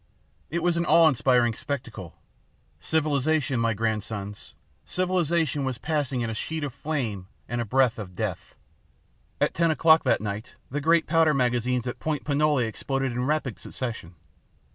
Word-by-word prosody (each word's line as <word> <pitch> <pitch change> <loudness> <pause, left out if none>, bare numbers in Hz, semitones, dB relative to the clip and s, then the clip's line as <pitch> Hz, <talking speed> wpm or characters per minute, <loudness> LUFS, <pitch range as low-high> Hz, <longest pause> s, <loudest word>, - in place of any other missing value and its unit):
It 170 +2 -2
was 175 -1 +2
an 170 - +1
awe 165 -1 +7
inspiring 125 -4 +3
spectacle. 115 - -6 0.6
Civilization, 145 - +1
my 115 -1 +1
grandsons, 105 -2 -4 0.3
civilization 170 -5 0
was 130 -2 -2
passing 145 -4 -1
in 115 - -1
a - - -3
sheet 160 +8 -4
of 140 -4 -3
flame 120 -13 -3 0.2
and 120 +1 -2
a - - -2
breath 125 0 +2
of 90 -4 -8
death. - - -4 0.8
At - - +1
ten 170 0 +2
o'clock 160 0 +5
that - - +3
night, 105 +1 -5 0.2
the 145 +2 -2
great 165 +2 +3
powder 160 -2 +3
magazines 125 -1 +1
at 120 - -4
Point 150 -3 -2
Pinole 145 -3 +2
exploded 135 +3 -2
in 125 +1 -2
rapid 145 -5 -1
succession. 115 -9 -6
135 Hz, 155 wpm, -26 LUFS, 115-155 Hz, 0.8 s, awe